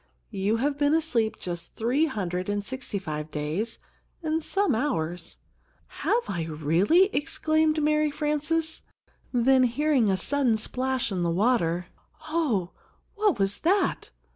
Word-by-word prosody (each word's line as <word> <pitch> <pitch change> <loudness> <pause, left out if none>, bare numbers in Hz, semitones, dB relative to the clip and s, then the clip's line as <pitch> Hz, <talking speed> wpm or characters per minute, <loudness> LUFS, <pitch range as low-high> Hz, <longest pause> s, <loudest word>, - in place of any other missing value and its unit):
You 205 +2 0
have 280 +4 -1
been 290 +1 +3
asleep 250 -9 0
just 175 -1 -6
three 250 +8 +2
hundred 185 - -3
and 205 0 -1
sixty 260 -3 -4
five 155 -4 -5
days 155 +10 -3 0.5
and 320 0 -1
some 390 -4 +1
hours." 175 - -2 0.5
"Have 475 +1 -1
I 170 -4 -2
really?" 165 - +3
exclaimed 310 0 +1
Mary 305 0 +2
Frances; 305 +2 -1 0.5
then 255 +1 +4
hearing 255 -1 +2
a 190 - +2
sudden 260 -1 +2
splash 255 +2 -1
in 185 -2 -1
the 170 - +1
water, 180 -3 +1 0.4
"Oh, 255 - 0 0.4
what 415 - +2
was 195 0 0
that? 385 +4 +1
245 Hz, 135 wpm, -26 LUFS, 185-305 Hz, 0.5 s, then